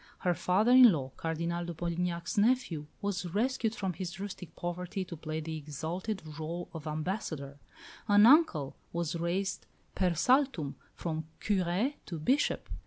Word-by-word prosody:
Her 180 - +2
father 195 +7 +2
in 250 -2 +9
law, 135 -6 -2
Cardinal 170 +1 -2
de 170 -1 -5
Polignac's 170 +1 -2
nephew, 205 - +2 0.2
was 200 -3 -1
rescued 230 -1 +1
from 190 -2 -2
his 175 +1 -6
rustic 190 -4 -7
poverty 180 +2 -3
to 170 - -7
play 155 0 -4
the 160 +1 -4
exalted 160 +7 -4
rôle 160 +3 -5
of 160 -2 -7
ambassador; 155 -3 -3 0.5
an 205 0 +7
uncle 235 - +5 0.2
was 170 -1 -2
raised 185 +3 -2 0.3
per 180 -3 +1
saltum 250 - +2 0.2
from 160 -2 -3
curé 195 +6 +1
to 170 - -4
bishop. 260 - +1
175 Hz, 145 wpm, -31 LUFS, 160-205 Hz, 0.5 s, in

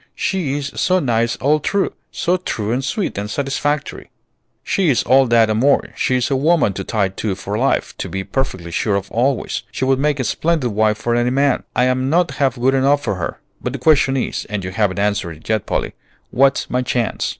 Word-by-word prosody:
She's 145 -7 -2
so 185 - +3
nice 120 -7 +1
all 150 +4 +2
through, 200 +6 0 0.2
so 180 - 0
true 110 - -3
and 125 +3 -1
sweet 140 - -2
and 105 +1 -4
satisfactory." 140 +3 -2 0.5
"She 190 -5 +1
is 130 - +2
all 135 0 +4
that 115 -1 +4
and 110 0 0
more; 140 +3 +3
she's 130 +1 0
a - - +3
woman 150 - +2
to 95 - -5
tie 100 -1 0
to 95 +1 -3
for 100 +2 -5
life, 130 +5 0
to - - -4
be 95 0 -3
perfectly 95 -9 -3
sure 100 +4 0
of 100 0 -3
always. 125 +2 0
She 130 - -2
would 135 0 +2
make 150 0 +1
a - - +1
splendid 155 -2 0
wife 105 +1 +2
for 120 +2 -1
any 120 +1 +2
man. 140 +1 +1
I'm 130 +1 +1
not 170 0 +2
half 135 -3 +2
good 130 +2 +3
enough 140 +2 +2
for - - -1
her; 90 - -5 0.2
but 125 - -3
the - - -3
question 135 0 +3
is, 130 - -2
and 105 -2 -4
you 90 - -4
haven't 100 -2 0
answered 100 -4 0
it 80 - -16
yet, 110 -2 0
Polly, - - -2 0.4
what's 135 +2 +2
my 125 - 0
chance?" 120 -2 -1
130 Hz, 210 wpm, -19 LUFS, 110-140 Hz, 0.5 s, all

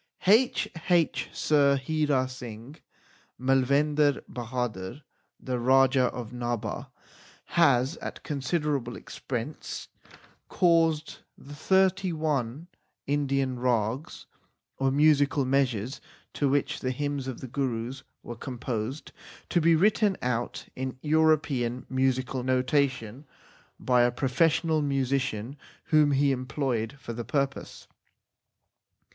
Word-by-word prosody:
H.H. 180 -6 +2
Sir 140 -2 +3
Hira 140 -1 0
Singh, 125 +2 -9 0.6
Malvendar 140 +3 +2
Bahadur, 120 -1 -4 0.4
the 125 -1 -3
Raja 130 +1 +4
of 120 -2 -4
Nabha, 120 -3 -3 0.7
has 140 -3 +3
at - - -7
considerable 145 -4 -2
expense 125 +3 -6 0.6
caused 165 -3 +2 0.2
the 145 - -12
thirty 190 +4 +2
one 150 -3 -2 0.4
Indian 135 -3 0
rags, 120 +2 -1 0.5
or 135 0 +2
musical 145 -1 +3
measures, 130 -2 0 0.3
to 140 - +1
which 140 +1 0
the 130 - -2
hymns 140 0 -3
of 130 - -5
the 130 - -7
Gurus 130 0 -3 0.2
were 120 - -7
composed, 125 +2 -5 0.4
to 175 - +2
be 165 +1 +5
written 205 +2 +3
out 120 -1 -2
in 130 0 -4
European 150 -6 +1
musical 130 0 0
notation 130 -1 0 0.5
by 125 -1 +3
a 120 0 +3
professional 155 +5 +1
musician 135 -3 -1 0.3
whom 155 -2 +4
he 140 +1 +3
employed 130 -2 -2
for 120 - -7
the 120 +1 -5
purpose. 140 +2 -3
135 Hz, 105 wpm, -27 LUFS, 125-150 Hz, 0.7 s, be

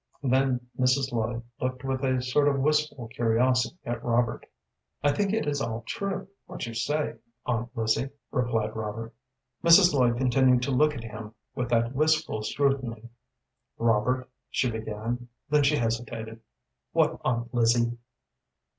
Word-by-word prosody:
Then 130 -1 +1
Mrs. 130 +1 +2
Lloyd 115 0 -2 0.2
looked 130 0 -3
with 135 0 -2
a 130 -1 +1
sort 145 +3 +2
of 140 -1 +2
wistful 150 -3 +1
curiosity 125 +6 +1
at 120 0 -3
Robert. 120 0 0 0.6
"I 145 - +4
think 200 +4 0
it 225 +1 0
is 145 -1 -1
all 115 -1 -3
true, 200 -3 -3 0.2
what - - -5
you 115 - -6
say, 145 +7 -1 0.3
Aunt 120 -1 -1
Lizzie," 115 +4 +1 0.2
replied 115 -3 0
Robert. 110 +1 -5 0.5
Mrs. 170 +1 +7
Lloyd 125 -4 +3
continued 125 0 +3
to 135 - -1
look 150 +3 +3
at 115 - -6
him 110 -1 -8 0.2
with 125 -1 -3
that 115 0 +2
wistful 155 -5 +1
scrutiny. 120 -2 -1 0.7
"Robert," 115 +3 +1 0.2
she 125 - 0
began, 110 +2 -4 0.2
then 150 0 +5
she 145 +1 +3
hesitated. 115 -2 -3 0.5
"What, - - +2
Aunt 120 0 -1
Lizzie?" 120 0 +3
125 Hz, 145 wpm, -27 LUFS, 115-135 Hz, 0.7 s, Mrs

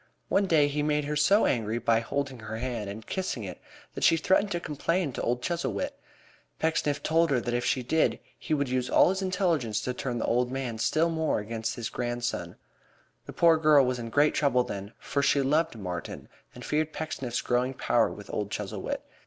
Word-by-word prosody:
One 195 0 +2
day 155 -4 +4
he 145 +1 -1
made 150 0 +1
her 150 +1 -2
so 195 +9 +4
angry 115 -2 0
by 115 -1 +2
holding 135 +2 -3
her 110 0 -6
hand 115 -4 -3
and 110 +2 -8
kissing 185 - -3
it 95 - -7 0.3
that - - -5
she 165 - +5
threatened 190 +5 +2
to 175 - -1
complain 165 +1 -1
to - - -5
old 125 +1 -1
Chuzzlewit. 175 - -2 0.7
Pecksniff 160 -3 0
told 165 +1 +3
her 135 -3 +2
that 120 0 -3
if 120 0 0
she 130 - 0
did 160 +6 +1 0.2
he 155 - -2
would 140 -1 0
use 125 0 -1
all - - +5
his 190 +1 -1
influence 170 - 0
to 125 +2 -2
turn 125 -1 -3
the - - -1
old 125 +1 +1
man 130 -4 -3
still 160 +8 +2
more 160 -1 0
against 110 +1 -3
his 115 - -4
grandson. 120 -8 -3 0.7
The - - -7
poor 165 -1 +5
girl 150 -3 +5
was 125 -1 -1
in 115 -1 -5
great 145 +5 +3
trouble 125 -4 +2
then, 100 -1 -6
for 140 +1 -2
she 140 0 +3
loved 155 +2 +1
Martin 90 -4 -6 0.3
and 125 - -9
feared 155 +1 0
Pecksniff's 135 -6 -3
growing 125 +2 0
power 120 -2 +2
with 105 - -10
old 105 -1 -2
Chuzzlewit. - - -4
135 Hz, 200 wpm, -28 LUFS, 120-155 Hz, 0.7 s, she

